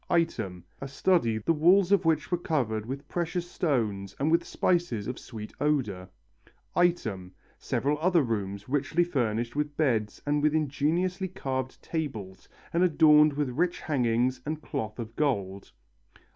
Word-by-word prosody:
Item, 110 Hz, -, 0 dB, 0.2 s
a 135 Hz, -, -5 dB
study 140 Hz, -6 st, +2 dB
the 110 Hz, +10 st, +1 dB
walls 180 Hz, +5 st, +4 dB
of 200 Hz, -3 st, +4 dB
which 160 Hz, 0 st, +1 dB
were 175 Hz, -, +2 dB
covered 115 Hz, -11 st, -1 dB
with 140 Hz, +3 st, -6 dB
precious 175 Hz, 0 st, -2 dB
stones 110 Hz, -, -1 dB
and 150 Hz, +3 st, +1 dB
with 170 Hz, +1 st, +3 dB
spices 170 Hz, -, 0 dB
of 125 Hz, -, -5 dB
sweet 110 Hz, -3 st, -9 dB
odour. 120 Hz, -12 st, 0 dB, 0.7 s
Item, 110 Hz, -, 0 dB, 0.3 s
several 145 Hz, +2 st, -1 dB
other 170 Hz, -1 st, +3 dB
rooms 100 Hz, -4 st, -3 dB
richly 145 Hz, +5 st, +1 dB
furnished 120 Hz, -7 st, -1 dB
with 145 Hz, 0 st, -2 dB
beds 115 Hz, -9 st, 0 dB
and 145 Hz, 0 st, +1 dB
with 150 Hz, +1 st, +2 dB
ingeniously 160 Hz, +6 st, 0 dB
carved 130 Hz, -7 st, -4 dB
tables 110 Hz, -, -5 dB, 0.2 s
and 170 Hz, -, +2 dB
adorned 150 Hz, -3 st, +6 dB
with 145 Hz, -2 st, -1 dB
rich 175 Hz, +7 st, 0 dB
hangings 125 Hz, -2 st, +1 dB
and 155 Hz, +2 st, -4 dB
cloth 110 Hz, -7 st, -4 dB
of 115 Hz, -1 st, -7 dB
gold. 100 Hz, -10 st, -1 dB
145 Hz, 145 wpm, -28 LUFS, 115-165 Hz, 0.7 s, adorned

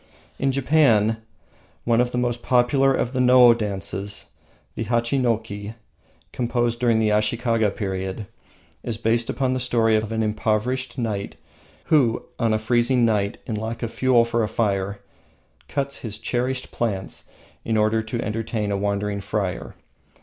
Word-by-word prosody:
In 135 Hz, 0 st, +2 dB
Japan, 130 Hz, -6 st, +3 dB, 0.7 s
one 115 Hz, 0 st, +3 dB
of 125 Hz, 0 st, 0 dB
the 125 Hz, -, -3 dB
most 120 Hz, -1 st, -1 dB
popular 130 Hz, +3 st, +3 dB
of 130 Hz, -1 st, -1 dB
the 130 Hz, -, -1 dB
No 125 Hz, -1 st, +7 dB
dances, 100 Hz, -2 st, -4 dB, 0.4 s
the -, -, -4 dB
Hachinoki, 115 Hz, -4 st, -1 dB, 0.6 s
composed 120 Hz, -1 st, -1 dB
during 120 Hz, -2 st, +3 dB
the 110 Hz, -1 st, +2 dB
Ashikaga 110 Hz, +1 st, +1 dB
period, 95 Hz, 0 st, -4 dB, 0.6 s
is 115 Hz, -3 st, -3 dB
based 115 Hz, +1 st, +1 dB
upon 130 Hz, -1 st, 0 dB
the 130 Hz, -, -1 dB
story 115 Hz, -3 st, +2 dB
of 110 Hz, 0 st, -1 dB
an 110 Hz, 0 st, 0 dB
impoverished 110 Hz, +4 st, -1 dB
knight, 110 Hz, -5 st, -3 dB, 0.5 s
who, 125 Hz, -7 st, +2 dB, 0.2 s
on 115 Hz, -2 st, +2 dB
a 110 Hz, -, +3 dB
freezing 120 Hz, +2 st, +2 dB
night, 105 Hz, -3 st, 0 dB
in 115 Hz, -, -4 dB
lack 110 Hz, +3 st, -4 dB
of 115 Hz, -1 st, -3 dB
fuel 125 Hz, -3 st, +3 dB
for 115 Hz, 0 st, 0 dB
a 110 Hz, -, +1 dB
fire, 100 Hz, -3 st, -1 dB, 0.7 s
cuts 140 Hz, -1 st, -2 dB
his 110 Hz, -3 st, -6 dB
cherished 125 Hz, +1 st, -2 dB
plants 100 Hz, -5 st, -3 dB, 0.4 s
in 110 Hz, -1 st, 0 dB
order 110 Hz, +1 st, +2 dB
to 115 Hz, +2 st, -4 dB
entertain 110 Hz, -1 st, -2 dB
a 100 Hz, -, 0 dB
wandering 100 Hz, 0 st, -1 dB
friar. 100 Hz, -3 st, -3 dB
115 Hz, 150 wpm, -23 LUFS, 105-125 Hz, 0.7 s, No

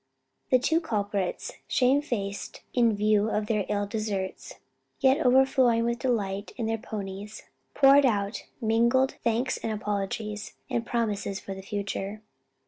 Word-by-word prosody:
The 255 Hz, -, +6 dB
two 320 Hz, +7 st, +1 dB
culprits, 205 Hz, -, -2 dB
shame 260 Hz, +3 st, +3 dB
faced 205 Hz, -8 st, -4 dB
in 235 Hz, -3 st, +3 dB
view 210 Hz, +1 st, +2 dB
of 210 Hz, -1 st, 0 dB
their 210 Hz, -2 st, 0 dB
ill 205 Hz, -1 st, 0 dB
deserts, 205 Hz, -3 st, -4 dB, 0.4 s
yet 270 Hz, +1 st, +4 dB
overflowing 250 Hz, -2 st, +4 dB
with 235 Hz, 0 st, -1 dB
delight 205 Hz, -5 st, -1 dB
in 235 Hz, -, -2 dB
their 225 Hz, 0 st, -1 dB
ponies, 205 Hz, 0 st, -7 dB, 0.3 s
poured 275 Hz, +1 st, +7 dB
out 205 Hz, -2 st, -1 dB
mingled 235 Hz, +3 st, +3 dB
thanks 240 Hz, +3 st, +1 dB
and 225 Hz, -, -3 dB
apologies, 210 Hz, 0 st, -3 dB, 0.2 s
and 230 Hz, 0 st, -1 dB
promises 210 Hz, -4 st, -1 dB
for 195 Hz, -, -7 dB
the 190 Hz, -, -8 dB
future. 200 Hz, +1 st, -4 dB
220 Hz, 135 wpm, -27 LUFS, 205-245 Hz, 0.4 s, poured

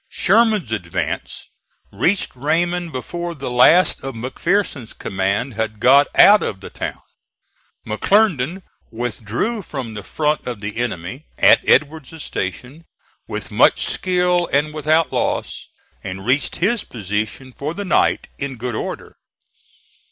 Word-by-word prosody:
Sherman's 215 Hz, -, +2 dB
advance 90 Hz, -6 st, -3 dB, 0.5 s
reached 190 Hz, -5 st, 0 dB
Raymond 170 Hz, +5 st, 0 dB
before 170 Hz, +6 st, -5 dB
the 135 Hz, -3 st, -5 dB
last 145 Hz, +9 st, +5 dB
of 135 Hz, -2 st, -5 dB
McPherson's 130 Hz, -, -2 dB
command 100 Hz, +7 st, -2 dB
had 110 Hz, -1 st, -3 dB
got 140 Hz, +5 st, +6 dB
out 210 Hz, +1 st, +8 dB
of 95 Hz, -, -3 dB
the 95 Hz, -, -10 dB
town. -, -, -5 dB, 0.8 s
McClernand 180 Hz, -, +1 dB, 0.3 s
withdrew 120 Hz, -, -3 dB
from 135 Hz, -, -6 dB
the 105 Hz, -, -6 dB
front 150 Hz, +8 st, -1 dB
of 120 Hz, -4 st, -4 dB
the 105 Hz, +1 st, -6 dB
enemy, 120 Hz, -, -4 dB
at -, -, +6 dB
Edward's 150 Hz, +1 st, +1 dB
station, 125 Hz, -, -5 dB, 0.4 s
with -, -, -6 dB
much -, -, +4 dB
skill 180 Hz, -1 st, +1 dB
and 150 Hz, +2 st, +1 dB
without 155 Hz, +1 st, +1 dB
loss, -, -, -2 dB, 0.4 s
and 95 Hz, 0 st, -6 dB
reached 130 Hz, +4 st, +1 dB
his 210 Hz, +5 st, 0 dB
position 110 Hz, +4 st, -4 dB
for 150 Hz, +6 st, -5 dB
the 205 Hz, -, -4 dB
night 185 Hz, -, +2 dB
in 140 Hz, -1 st, -3 dB
good 120 Hz, +1 st, -4 dB
order. -, -, -6 dB
140 Hz, 130 wpm, -20 LUFS, 110-175 Hz, 0.8 s, out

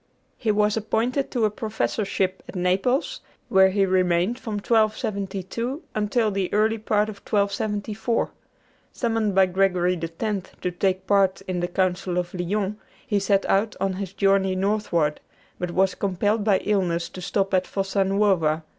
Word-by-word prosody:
He 230 Hz, -, -3 dB
was 210 Hz, 0 st, +3 dB
appointed 230 Hz, +5 st, 0 dB
to 235 Hz, -4 st, +1 dB
a 210 Hz, -, +1 dB
professorship 205 Hz, -3 st, -2 dB
at -, -, -9 dB
Naples, 190 Hz, +9 st, 0 dB, 0.3 s
where 190 Hz, 0 st, +6 dB
he 195 Hz, +1 st, +2 dB
remained 185 Hz, +4 st, +1 dB
from 220 Hz, -, -5 dB
1272 215 Hz, -, -1 dB
until 215 Hz, +1 st, +1 dB
the 195 Hz, -2 st, -2 dB
early 220 Hz, +2 st, +2 dB
part 210 Hz, 0 st, +1 dB
of 215 Hz, -2 st, -7 dB
1274. 210 Hz, +2 st, -1 dB, 0.6 s
Summoned 225 Hz, -4 st, -1 dB
by 190 Hz, 0 st, +6 dB
Gregory 180 Hz, -1 st, +1 dB
X. 190 Hz, +4 st, -3 dB
to 180 Hz, -, -1 dB
take 185 Hz, +1 st, -1 dB
part 195 Hz, -1 st, +2 dB
in 185 Hz, -2 st, -3 dB
the 175 Hz, -, -1 dB
Council 180 Hz, 0 st, -1 dB
of 175 Hz, 0 st, -2 dB
Lyons, 195 Hz, +3 st, -2 dB, 0.3 s
he 210 Hz, -6 st, +1 dB
set 195 Hz, 0 st, +2 dB
out 205 Hz, +2 st, +1 dB
on 195 Hz, -1 st, 0 dB
his 190 Hz, 0 st, -5 dB
journey 195 Hz, -1 st, +2 dB
northward, 185 Hz, -6 st, 0 dB, 0.4 s
but 180 Hz, -, -2 dB
was 185 Hz, +1 st, +2 dB
compelled 205 Hz, +3 st, 0 dB
by 205 Hz, -2 st, +4 dB
illness 180 Hz, -5 st, 0 dB
to 185 Hz, -, -9 dB
stop 195 Hz, +1 st, -1 dB
at 185 Hz, -1 st, +2 dB
Fossa 195 Hz, 0 st, 0 dB
Nuova. 190 Hz, -6 st, +2 dB
195 Hz, 155 wpm, -24 LUFS, 185-210 Hz, 0.6 s, where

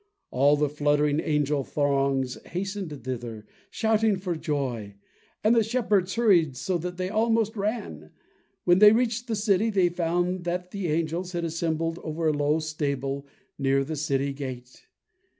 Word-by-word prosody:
All 140 Hz, +3 st, +4 dB
the 150 Hz, 0 st, +2 dB
fluttering 145 Hz, 0 st, +1 dB
angel 150 Hz, -2 st, 0 dB
throngs 135 Hz, -2 st, 0 dB
hastened 185 Hz, -, -5 dB
thither, 120 Hz, -4 st, -5 dB, 0.2 s
shouting 220 Hz, -2 st, +2 dB
for 185 Hz, -2 st, -3 dB
joy, 130 Hz, -10 st, -3 dB, 0.5 s
and 215 Hz, +2 st, +5 dB
the 230 Hz, -, +5 dB
shepherds 210 Hz, -5 st, 0 dB
hurried 175 Hz, -, +3 dB
so 180 Hz, +4 st, -1 dB
that 180 Hz, +2 st, -5 dB
they 185 Hz, 0 st, -2 dB
almost 225 Hz, +1 st, +1 dB
ran. 200 Hz, -, -3 dB, 0.5 s
When 175 Hz, +1 st, +4 dB
they 210 Hz, +1 st, +9 dB
reached 240 Hz, +1 st, 0 dB
the 225 Hz, -, -1 dB
city, 205 Hz, +1 st, +2 dB
they 190 Hz, -4 st, +3 dB
found 175 Hz, +1 st, -1 dB
that 180 Hz, +1 st, -3 dB
the 200 Hz, -3 st, -3 dB
angels 165 Hz, +3 st, -1 dB
had 170 Hz, -1 st, -2 dB
assembled 165 Hz, 0 st, -2 dB
over 160 Hz, +1 st, -2 dB
a -, -, +1 dB
low 145 Hz, +1 st, +1 dB
stable 140 Hz, -3 st, -3 dB, 0.3 s
near 135 Hz, 0 st, +2 dB
the 155 Hz, +3 st, -4 dB
city 140 Hz, -2 st, -1 dB
gate. 130 Hz, -3 st, -8 dB
165 Hz, 150 wpm, -26 LUFS, 140-195 Hz, 0.5 s, they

